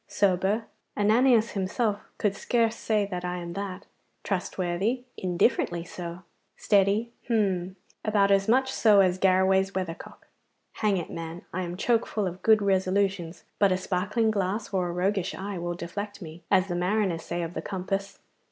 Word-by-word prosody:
Sober 200 +3 +1 0.3
Ananias 225 +2 +4
himself 205 +2 -1 0.2
could 205 -2 0
scarce 230 +2 +1
say 215 -3 0
that 180 -3 -5
I 180 0 -2
am 170 -1 -6
that. 195 0 -5 0.4
Trustworthy 190 +5 -1
indifferently 175 -1 +1
so. 175 0 -7 0.3
Steady 205 +3 +2 0.2
hum! 190 -6 0 0.3
about 205 -2 +3
as 195 0 +3
much 260 +3 +3
so 210 -3 +5
as 185 -1 +2
Garraway's 190 +1 +3
weathercock. 180 -3 -5 0.5
Hang 210 -3 0
it, 170 - -5
man, 165 +1 -6
I 185 - -1
am 175 0 -4
choke 230 +3 +1
full 210 -2 -1
of 180 0 -5
good 220 -2 +5
resolutions, 190 -3 0 0.2
but 200 -2 +4
a 185 - +2
sparkling 205 +5 0
glass 205 +1 -2
or 185 -2 +1
a - - -3
roguish 185 +1 -1
eye 195 -1 -5
will 175 0 -3
deflect 200 +5 -6
me, 165 -2 -10
as 190 -1 +4
the 180 - -3
mariners 180 -1 0
say 170 +1 -3
of 165 +1 -5
the - - -4
compass. 195 +1 -3
195 Hz, 160 wpm, -27 LUFS, 180-210 Hz, 0.5 s, so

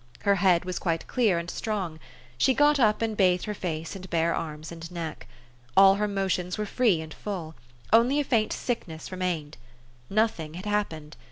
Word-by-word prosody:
Her 200 - +3
head 180 -2 +3
was 185 -1 -3
quite 165 -2 -1
clear 220 -8 +2
and 170 0 -3
strong. 185 -5 -3 0.4
She 260 - +3
got 290 +2 +4
up, 215 -2 +3
and 220 -1 -1
bathed 180 -3 +3
her 210 - -3
face 165 -3 -4
and 190 -1 -9
bare 170 0 +1
arms 155 0 -5
and 165 0 -8
neck. 165 -3 -6 0.5
All 195 0 +9
her 210 +1 0
motions 190 -2 -1
were 210 - -1
free 210 -6 +2
and 160 0 -8
full; 175 -6 -5 0.4
only 245 +6 +5
a - - +2
faint 230 -6 +1
sickness 170 -11 -4
remained. 175 -5 -3 0.5
Nothing 195 -7 0
had 185 +3 -7
hap 210 0 +1
pened. 155 -1 -10
185 Hz, 185 wpm, -27 LUFS, 165-210 Hz, 0.5 s, All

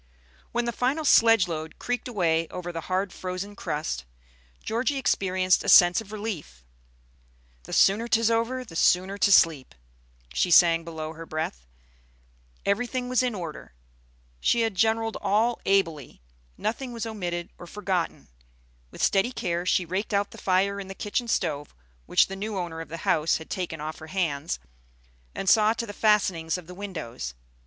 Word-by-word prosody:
When 240 0 0
the 235 - 0
final 270 +7 -1
sledge 225 -7 +6
load 160 -1 -5
creaked 245 +1 -3
away 165 -8 +1
over 175 +1 -6
the 165 -1 -5
hard 185 0 0
frozen 185 +2 -5
crust, 150 - -3 0.6
Georgie 255 +6 -1
experienced 185 -7 +2
a 205 - -1
sense 175 +1 +7
of 210 -2 -13
relief. 200 - -6 1.0
"The - - -8
sooner 210 +4 +4
'tis 230 -1 +3
over, 240 +3 0
the 165 - -12
sooner 185 +4 +2
to 200 - +3
sleep," 160 - +4 0.6
she 180 - +1
sang 170 -1 +6
below 160 -1 -6
her 165 0 -10
breath. 60 - -4 1.0
Everything 245 +4 -1
was 255 0 +3
in 250 -3 -1
order. 165 - -7 0.7
She 235 - +2
had 225 -2 +1
generalled 225 +3 +1
all 225 +4 +1
ably; 165 - 0 0.3
nothing 240 +3 -3
was 230 -1 -4
omitted 175 -6 -4
or 175 - -10
forgotten. 180 - -3 0.6
With - - -6
steady 195 +5 +3
care 175 -6 -2
she 180 - +2
raked 195 +5 -2
out 200 0 0
the - - -11
fire 195 +2 +1
in 195 - -7
the 195 - -8
kitchen 215 +5 -2
stove, 150 -9 -2 0.3
which - - +5
the 195 - -7
new 205 +1 -4
owner 170 -3 -4
of 165 - -9
the 165 - -6
house 155 +1 +2
had 160 - -12
taken 175 -4 -3
off 155 +1 -6
her 155 - -10
hands, 155 - -2 0.8
and 195 - -4
saw 215 +1 +5
to 235 0 -4
the 205 - -8
fastenings 190 -7 +2
of 180 - -10
the 180 - -10
windows. 155 - -6
190 Hz, 165 wpm, -26 LUFS, 165-220 Hz, 1.0 s, sense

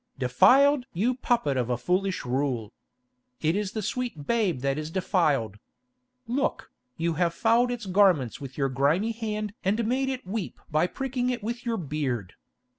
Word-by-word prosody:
"Defiled! 255 - +5
you 220 +9 +1
puppet 235 - 0
of 125 -1 -1
a 125 - +1
foolish 185 +3 -1
rule! 125 -4 -1 0.7
It 160 +2 +1
is 205 0 -2
the 215 - -3
sweet 225 - -3
babe 205 - +1
that 140 +2 0
is 155 0 -4
defiled! 155 - 0 0.7
Look, 250 +4 -2 0.3
you 165 0 0
have 170 -1 +2
fouled 235 +4 +3
its 240 -3 -4
garments 185 - +3
with 135 -2 -8
your 135 -2 +1
grimy 145 - +1
hand 215 -2 -4
and 215 +4 +1
made 265 +3 0
it 260 -1 -4
weep 195 +1 -4
by 155 +4 +3
pricking 255 +2 -2
it 245 -4 -3
with 235 +2 -4
your 230 -1 0
beard. 135 - -3
190 Hz, 165 wpm, -27 LUFS, 140-235 Hz, 0.7 s, Defiled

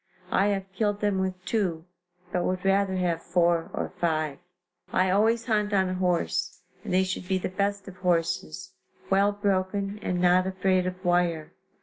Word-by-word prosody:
I 200 - +3
have 195 -2 0
killed 205 0 0
them 205 -2 +1
with 185 -1 -3
two, 180 -7 -1 0.5
but 180 - 0
would 185 +1 -2
rather 195 0 +2
have 175 -3 0
four 170 -1 +1
or - - -4
five. 155 -3 0 0.5
I 185 0 +2
always 225 +4 +2
hunt 210 -3 0
on 190 -2 +3
a - - -2
horse, 180 -1 -1 0.2
and - - -5
they 185 +1 +4
should 185 -1 -4
be 190 0 +1
the 185 - -3
best 200 +1 -2
of 185 -1 -10
horses, 165 - -1 0.4
well 200 +1 +4
broken 200 0 -1
and 180 -3 -1
not 180 +1 +4
afraid 185 -1 +1
of 185 +1 -6
wire. 175 -3 +1
185 Hz, 175 wpm, -27 LUFS, 180-200 Hz, 0.5 s, they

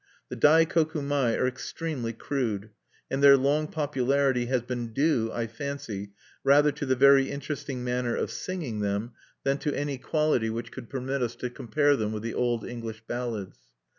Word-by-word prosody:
The - - -5
Daikoku 160 0 +4
mai 140 -5 +1
are - - +1
extremely 130 0 -4
crude; 110 -4 -3 0.4
and 135 - 0
their 140 -1 +9
long 145 +3 +1
popularity 135 -4 +1
has 125 -2 +1
been 120 -2 -4
due, 135 -5 +2
I 115 - -2
fancy, 115 -5 -6 0.3
rather 145 +2 +5
to 145 0 -5
the 130 - +3
very 135 +1 +6
interesting 140 -2 -4
manner 125 -1 -1
of - - -2
singing 160 - -4
them 100 +3 -1 0.3
than 135 +1 +1
to 150 - -2
any 145 -2 -2
quality 150 -5 +1
which 115 +1 -4
could 125 -3 -9
permit 135 +1 -2
us 120 -1 -1
to 125 - -4
compare 145 +4 +2
them 110 -4 -2
with 105 0 -5
the 115 - -3
old 120 -3 0
English 115 -2 -7
ballads. 120 -5 -4
130 Hz, 170 wpm, -27 LUFS, 115-145 Hz, 0.4 s, their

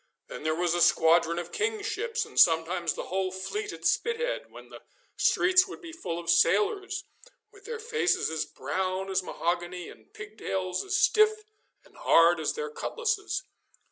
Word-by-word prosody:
Then - - -8
there 155 +1 0
was 175 0 0
a 175 - 0
squadron 165 0 +4
of 175 0 -5
King's 430 -1 -2
ships, 440 +1 -2
and 440 - -4
sometimes 165 +1 +3
the - - -5
whole 190 0 -2
fleet 410 - -4
at - - -10
Spithead, 470 +2 0
when - - -13
the - - -12 0.3
streets 370 +1 +4
would 385 - -9
be 340 -4 -10
full 185 - -5
of 170 -1 -8
sailors, 390 - +2 0.5
with 400 -2 -19
their 470 -1 -5
faces 450 -3 0
as 160 -1 -1
brown 190 +1 -3
as 190 - +1
mahogany 175 0 -3
and - - -16
pigtails 195 - -4
as 390 0 -2
stiff 430 +1 +3 0.4
and - - -22
hard 165 0 +5
as 155 - -1
their 460 -1 -4
cutlasses. 465 0 -2
335 Hz, 170 wpm, -28 LUFS, -, 0.5 s, hard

